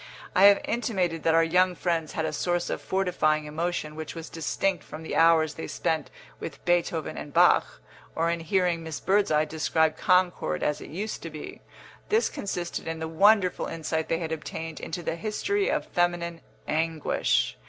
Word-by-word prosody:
I 190 - +7
have 200 0 +7
intimated 190 -8 -1
that 165 +1 +3
our 165 - +5
young 180 +2 +3
friends 165 -3 -1
had 160 - -1
a 155 - -2
source 175 +3 -1
of - - -3
fortifying 155 -5 +1
emotion 155 0 -3
which 160 +1 -6
was 165 -1 -8
distinct 170 +2 -1
from 155 - -9
the - - -4
hours 160 -2 +4
they 160 - -6
spent 160 -1 -1 0.3
with - - -8
Beethoven 175 -2 0
and 145 - -8
Bach, - - +4 0.4
or 165 +1 +1
in 170 - -2
hearing 175 0 +1
Miss 160 -2 -5
Birdseye 190 -6 +2
describe 160 0 +1
Concord 180 - +2
as 150 - 0
it - - -9
used 200 +8 -4
to 165 - -6
be. 155 -1 -9 0.5
This 445 +2 +3
consisted 175 -4 -4
in 165 0 -3
the 160 0 -4
wonderful 195 +3 +3
insight 160 -1 -3
they 165 - +1
had 165 -1 -4
obtained 160 0 -5
into 175 +1 -5
the 165 - -2
history 395 - -1
of - - 0
feminine 175 -1 -1 0.3
anguish. 155 - 0
165 Hz, 175 wpm, -27 LUFS, 160-180 Hz, 0.5 s, I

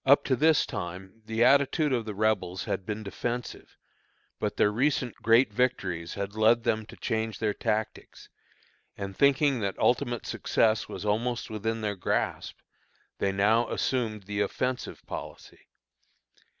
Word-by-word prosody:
Up 140 +2 +5
to 130 - +1
this 155 +4 +4
time 95 +5 -7
the 110 +1 +1
attitude 140 +3 +4
of 120 -3 0
the 105 -2 -5
Rebels 100 -4 0
had 95 - -3
been 110 0 -3
defensive, 120 +5 -5 0.6
but - - -2
their 105 - +4
recent 125 +1 0
great 115 0 +4
victories 95 -9 -1
had 100 0 -4
led 110 +2 +3
them 110 -1 0
to - - -11
change 110 0 -2
their 105 -2 0
tactics, 110 +1 -3 0.7
and 100 -1 -5
thinking 140 0 +3
that 100 -3 -2
ultimate 120 -1 +1
success 110 -1 +1
was - - -6
almost 115 +4 -1
within 110 +1 -2
their 105 -1 -2
grasp, 90 - -2 0.6
they 100 - +1
now 105 +4 +2
assumed 110 -5 -1
the 100 +1 -4
offensive 125 +5 -3
policy. - - -9
110 Hz, 145 wpm, -28 LUFS, 100-125 Hz, 0.7 s, Up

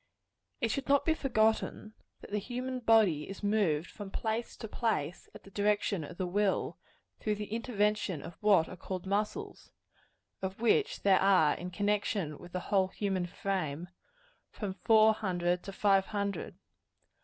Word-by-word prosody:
It 230 - +1
should 275 - -3
not 280 0 +4
be 320 - +4
forgotten, 220 -5 0 0.3
that - - -12
the 210 - 0
human 250 +4 -4
body 215 -10 +3
is 195 +1 -8
moved 195 -7 +1
from 205 -2 -8
place 220 +3 -3
to 220 - -6
place, 190 -9 -2
at - - -11
the 195 - -15
direction 205 -2 +1
of 175 +4 -9
the 185 - -1
will, 195 +2 0 0.4
through 210 -1 0
the 210 0 -6
intervention 210 - 0
of - - -8
what 200 -6 +5
are - - -8
called 185 0 -6
muscles 215 - -2 0.7
of 190 +1 -4
which 430 - +2
there 195 -2 +5
are 185 -6 +5
in 180 - -6
connection 200 -4 -1
with 175 - -12
the 180 - -3
whole 190 -1 +2
human 190 -2 -2
frame, 175 -3 -3 0.6
from 205 -3 -5
four 220 +3 +5
hundred 180 -4 -1
to 195 - -5
five 195 -1 +3
hundred. 200 -1 -3
200 Hz, 160 wpm, -31 LUFS, 185-220 Hz, 0.7 s, what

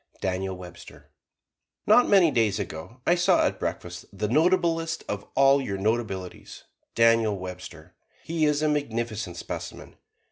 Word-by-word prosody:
DANIEL 95 0 -3
WEBSTER 90 -1 -13 0.7
Not 245 +4 +5
many 190 -6 +5
days 110 -6 +1
ago 95 +4 -7
I 175 - +4
saw 175 0 +3
at - - -2
breakfast 90 0 -5
the 105 +1 -3
notablest 165 - +1
of 100 0 -5
all 135 +1 +5
your 100 -7 -4
notabilities, 95 -3 -3 0.3
Daniel 115 -2 +3
Webster. 90 -2 -9 0.3
He 160 -1 0
is 150 0 +1
a - - +3
magnificent 115 - -2
specimen. - - -8
115 Hz, 135 wpm, -26 LUFS, 95-150 Hz, 0.7 s, Not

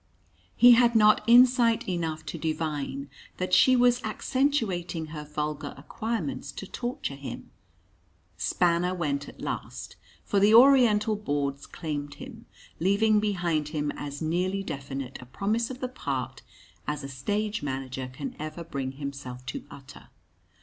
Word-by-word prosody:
He 245 0 +8
had 235 0 +5
not 215 -1 +5
insight 240 -1 +5
enough 165 -3 -2
to 165 - -6
divine 150 -3 -3 0.3
that 185 0 -3
she 255 - +6
was 245 0 +4
accentuating 215 - -1
her 150 -1 -5
vulgar 150 0 -4
acquirements 225 - -4
to - - -7
torture 240 - -4
him. 140 -1 -8 0.8
Spanner 180 +1 +1
went 145 -5 -2
at - - -14
last - - -5 0.3
for 200 - +1
the 210 +3 +6
Oriental 230 -5 +6
boards 140 -7 -2
claimed 145 -3 -5
him 245 -3 -11 0.3
leaving 210 +4 +3
behind 175 -7 0
him 150 -1 -2
as 145 +1 -6
nearly 185 +5 0
definite 135 -5 -6
a 125 - -12
promise 215 - -1
of 260 0 -8
the 255 - -1
part 140 - -4 0.5
as 150 -1 -3
a - - -5
stage 205 - -2
manager 130 -2 -4
can 255 - -6
ever 155 +2 -5
bring 135 -5 -4
himself 135 -3 -7
to 135 - -6
utter. 135 -2 -13
170 Hz, 140 wpm, -27 LUFS, 145-220 Hz, 0.8 s, He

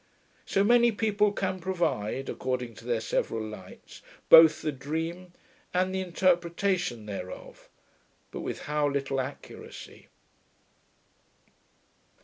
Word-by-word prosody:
So 195 - +2
many 235 +2 +5
people 210 -1 +1
can 190 -2 -2
provide, 165 - -2
according 125 -2 -3
to - - -13
their 120 -2 0
several 110 0 -1
lights, 105 -4 -11 0.3
both 160 -1 +8
the 155 - 0
dream 165 +6 -5 0.4
and 185 +1 +1
the 190 - -1
interpretation 175 - 0
thereof, 95 -3 -8 0.6
but - - -6
with - - -5
how 150 -1 0
little 135 -1 -1
accuracy! 130 +2 -10
160 Hz, 110 wpm, -28 LUFS, 130-185 Hz, 0.6 s, both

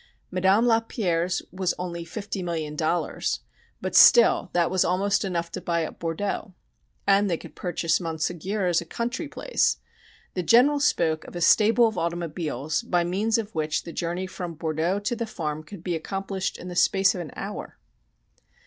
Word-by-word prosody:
Madame 190 +5 +3
Lapierre's 190 -7 +1
was 185 -1 -1
only 170 -1 -4
fifty 200 +3 -5
million 160 -4 -3
dollars 160 +3 -1 0.4
but - - -3
still 480 - +7
that 175 -1 +1
was 185 -1 +3
almost 195 +4 +1
enough 170 -3 -2
to - - -5
buy 170 -1 0
up - - -9
Bordeaux. 185 +3 -3 0.5
And 200 0 +4
they 170 - 0
could - - -12
purchase 165 -2 0
Monségur 175 +4 -2
as 175 -1 +2
a - - -8
country 240 - -3
place. - - 0 0.6
The 185 - -1
General 250 - +5
spoke 165 - +1
of - - -11
a - - -3
stable 225 +6 +5
of 220 - -3
automobiles 165 - -2
by 180 -7 +1
means 205 +6 +1
of 220 -1 -4
which 155 -2 -1
the 170 - -8
journey 175 +2 -2
from 180 -2 -6
Bordeaux 160 +4 -1
to 230 +4 -1
the 230 -1 -3
farm 155 -7 -4
could 175 +1 -11
be 180 - -2
accomplished 195 +3 -3
in 180 - -9
the 180 - -6
space 195 +2 +4
of 180 - -4
an 160 - -7
hour. 200 +1 -6
180 Hz, 175 wpm, -25 LUFS, 165-205 Hz, 0.6 s, still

